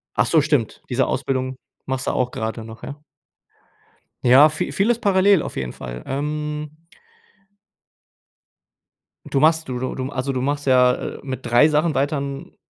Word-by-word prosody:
Ach - - +3
so, 160 - +3
stimmt. 145 -7 0
Diese 130 +1 +1
Ausbildung 130 -1 -2 0.3
machst 130 -1 -3
du - - +2
auch 125 -1 -1
grade 110 +1 -4
noch, 110 +1 -11
ja? 145 +1 -7 1.2
Ja, 130 +4 +7
vi 180 - -1
vieles 225 +4 +2
parallel 195 -3 +4
auf - - -6
jeden 65 -2 -4
Fall. - - -8
Ähm 150 +2 -3 2.6
Du 135 - 0
machst 160 +2 +3
du 125 -1 -3
du 130 - -3
du 130 0 -4
also, 135 -1 -2
du 130 -1 -2
machst 145 +2 -2
ja, 125 -1 +5
äh, - - -6
mit 130 -2 -6
3 120 +5 +5
Sachen 155 +1 +1
weiter 145 +2 +1
n 140 0 -6
135 Hz, 160 wpm, -21 LUFS, 125-150 Hz, 2.6 s, Ja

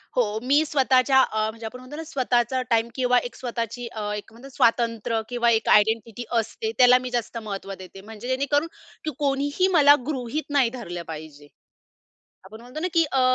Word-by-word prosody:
हो, 220 -3 +1
मी 285 +4 +3
स्वतःच्या 265 -2 +3
अ, 215 -3 0
म्हणजे 225 +1 -9
आपण 250 +3 -7
म्हणतो 255 +4 -10
ना 325 - -5
स्वतःचा 255 -4 0
टाईम 230 0 +2
किंवा 250 -1 +2
एक - - -21
स्वतःची 240 -1 -4
अ, 215 - -6
एक 210 +1 -8 0.2
स्वातंत्र्य 230 -1 +1
किंवा 240 -1 +1
एक 225 0 +1
आयडेंटिटी 220 +2 +2 0.2
असते, 220 0 -4
त्याला 250 0 +7
मी 255 0 -5
जास्त 240 -1 -3
महत्व 195 -2 -6
देते. 190 +1 -11
म्हणजे 220 +3 -10
जेणेकरून 280 +4 +1 0.4
की 310 - -1
कोणीही 285 +5 +1
मला 290 -1 +8
गृहीत 275 +1 -3
नाही 275 -5 +3
धरलं 175 -9 -7
पाहिजे. 150 -2 -9 1.0
आपण 220 +4 -12
म्हणतो 250 +6 -8
ना 360 - -1
की 330 -1 +5
अ, 265 - +2
240 Hz, 175 wpm, -24 LUFS, 220-265 Hz, 1.0 s, मला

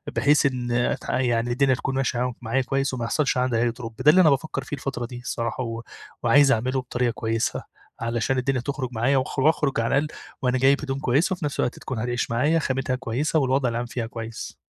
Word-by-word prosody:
بحيث 145 +1 +4
إن 125 -3 -1
ات 120 0 0
يعني 120 -2 +1
الدنيا 130 +1 +3
تكون 130 +1 -3
ماشية 130 -2 0
ع 125 0 0
معايا 125 +4 0
كويس 135 +1 -1
وما 120 -2 -2
يحصلش 135 +2 +1
عندي 125 -2 +1
أي 120 +1 +2
drop 115 -1 -8
ده 150 - +8
اللي 185 - +6
أنا 165 - +6
بافكر 140 -1 -1
فيه 140 - -5
الفترة 135 -3 -4
دي 120 +1 -8
الصراحة، 120 0 -3
و 115 -1 -5 0.4
وعايز 135 +4 +5
أعمله 130 +2 +1
بطريقة 125 0 -1
كويسة 115 0 -2 0.4
علشان 120 +3 -1
الدنيا 130 0 0
تخرج 135 -1 -3
معايا 125 +5 +2
وأخ 130 +1 -2
وأخرج 145 -1 +2
على 115 +4 +2
الأقل 150 +2 -2 0.2
وأنا 130 -1 +1
جايب 135 +3 +4
هدوم 135 -2 -3
كويسة، 145 - +2
وفي 180 -4 -4
نفس 145 - -4
الوقت 125 - -1
تكون 130 -4 -5
هتعيش 120 0 -2
معايا 150 +8 +2
خامتها 130 -2 -1
كويسة 130 +5 0
والوضع 130 -2 +1
العام 120 +1 -2
فيها 120 -1 -4
كويس. 115 0 -7
130 Hz, 210 wpm, -24 LUFS, 120-140 Hz, 0.4 s, ده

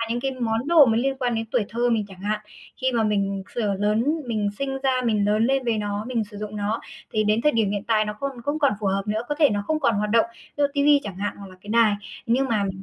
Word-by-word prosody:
Mà - - +1
những 240 +1 -1
cái 270 +1 -1
món 235 0 -2
đồ 325 -4 +7
mà 225 -2 +2
liên 270 +2 0
quan 245 -2 0
đến 225 0 -2
tuổi 245 -5 +1
thơ 240 +2 0
mình 225 -3 +1
chẳng 190 -2 -13
hạn, 210 +2 -1 0.4
khi 260 0 +2
mà 235 -2 +2
mình 200 -2 0
sửa 210 -4 0
lớn 210 +3 +1 0.2
mình 215 -3 -1
sinh 270 -1 -2
ra 260 -2 +2
mình 215 -3 +2
lớn 210 +2 +2
lên 270 0 +1
với 230 -2 +1
nó, 205 0 -3
mình 235 -4 0
sử 205 0 -13
dụng 210 0 -6
nó 210 +2 -1 0.3
thì 215 -1 +1
đến 215 +2 +2
thời 300 - +4
điểm 220 -3 +1
hiện 205 0 -3
tại 220 -2 +2
nó 210 0 -4
còn 275 -4 -4
không 290 +5 -1
còn 285 -5 +3
phù 210 - -2
hợp 195 +1 +1
nữa, 215 +1 -1
có 295 - 0
thể 295 -4 +5
nó 205 -1 -1
không 310 0 0
còn 265 -6 +2
hoạt 210 +1 -1
động, 230 +1 +4
ví - - -20
dụ - - +6
ti 285 - +2
vi 290 -1 +6
chẳng 200 -3 -6
hạn 205 +2 -3
hoặc 200 - -10
là 185 - -14
cái 205 - -15
đài. 225 -2 +4 0.3
Nhưng 260 +3 +2
mà 215 -4 +1
mình 190 -1 -5
225 Hz, 300 wpm, -24 LUFS, 205-255 Hz, 0.4 s, đồ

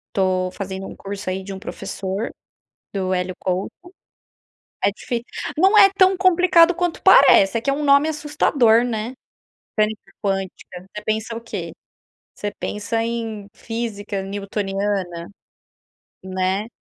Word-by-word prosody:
estou 185 -1 +1
fazendo 190 -1 -6
um - - -9
curso 200 -1 -6
aí 190 +1 -3
de 195 0 -7
um 190 - -7
professor, 195 +3 -4 0.6
do 190 -2 -1
Hélio 180 0 -2
Couto. 185 +1 -2 1.1
É 200 - +5
dif 235 +3 -4 0.3
não 385 +6 +5
é 395 -2 +9
tão 375 -1 +5
complicado 360 -2 +5
quanto 355 -1 -2
parece, 195 +3 +7
é - - -2
que 275 - -1
é 275 - +3
um 295 - -3
nome 280 +2 +5
assustador, 290 -6 +3
né, 230 0 -3 0.7
mecânica 215 0 -1
quântica, 190 -2 -4
você 210 - -5
pensa 220 +1 -2
o 230 - -5
quê? 185 -8 -6 0.6
Você 205 0 -4
pensa 225 +2 -2
em 225 -3 -4
física 215 -4 -4
newtoniana, 195 -3 -3 1.0
né. 190 +2 -1
210 Hz, 135 wpm, -21 LUFS, 190-240 Hz, 1.1 s, é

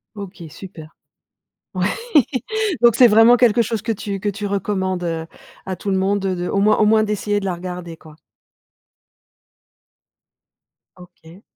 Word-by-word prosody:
OK 195 -3 -9
super. 165 -2 -12 0.8
Oui. 185 0 0 1.0
Donc 235 -2 +6
c'est 245 -2 +7
vraiment 225 +3 +6
quelque 235 -1 +3
chose 225 -2 -3
que 230 - -4
tu 200 -2 -5
que 205 - -2
tu 205 +1 -4
recommandes, 190 -2 -2
heu, 165 -1 -3 0.4
à 190 - -3
tout 200 - -5
le 190 - +1
monde, 195 +1 0
heu, 185 -1 -1
de 175 0 -4
au 200 - 0
moins 215 +1 +3
au 215 - +4
moins 220 0 +4
d'essayer 205 -1 -1
de - - -8
la 185 -2 -2
regarder, 175 -1 -8
quoi? 155 -1 -16 2.8
OK. 180 +1 -17
195 Hz, 155 wpm, -19 LUFS, 180-210 Hz, 2.8 s, c'est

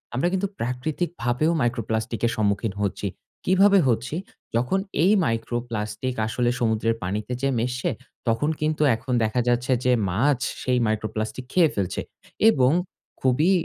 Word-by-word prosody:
আমরা 155 +8 +1
কিন্তু 195 +1 +1
প্রাকৃতিকভাবেও 130 +2 -1
micro 120 0 +1
plastic 110 +1 -1
এর - - -1
সম্মুখীন 100 0 0
হচ্ছি। 100 0 -1 0.4
কিভাবে 195 +2 +5
হচ্ছি? 120 +5 0 0.4
যখন 125 +11 +1 0.2
এই 195 - +5
micro 115 +1 -1
plastic 105 +3 -3
আসলে 120 +2 0
সমুদ্রের 115 0 +1
পানিতে 105 +5 -3
যেয়ে 135 -2 +1
মিশে, 125 +2 -1 0.4
তখন 115 +7 +2
কিন্তু 155 0 0
এখন 125 +2 -4
দেখা 110 +3 +1
যাচ্ছে 120 +2 +1
যে 125 - +4 0.2
মাছ 125 +8 +2 0.2
সেই 125 -1 +2
micro 110 0 0
plastic 110 +4 -3
খেয়ে 170 -4 +5
ফেলছে 95 -3 -1 0.5
এবং 130 - +4 0.5
খুবই 140 +8 +3
125 Hz, 145 wpm, -24 LUFS, 110-140 Hz, 0.5 s, কিভাবে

